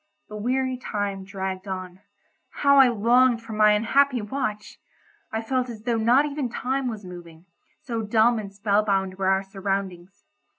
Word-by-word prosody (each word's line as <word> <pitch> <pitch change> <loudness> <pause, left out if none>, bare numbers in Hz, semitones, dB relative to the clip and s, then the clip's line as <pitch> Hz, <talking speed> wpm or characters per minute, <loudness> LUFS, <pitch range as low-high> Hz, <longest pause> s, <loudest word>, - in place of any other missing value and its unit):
The 210 - -8
weary 255 +4 -1
time 205 -5 -4
dragged 190 -1 -5
on. 185 -1 -6 0.5
How 280 -1 +3
I 270 -1 +8
longed 240 +1 +3
for 225 -1 -8
my 210 0 +5
unhappy 255 +5 +2
watch! 210 -1 -4 0.5
I 220 +1 -3
felt 255 +1 -1
as 220 -2 -9
though 235 -1 0
not 240 +6 +4
even 285 -3 -3
time 260 +2 -2
was 215 -4 -6
moving, 175 -2 -11 0.4
so 230 -3 -3
dumb 220 +2 +3
and 200 -2 -7
spell 205 +1 +1
bound 195 -2 -1
were 190 - 0
our 190 0 +2
surroundings. 195 -2 -5
215 Hz, 165 wpm, -24 LUFS, 195-245 Hz, 0.5 s, I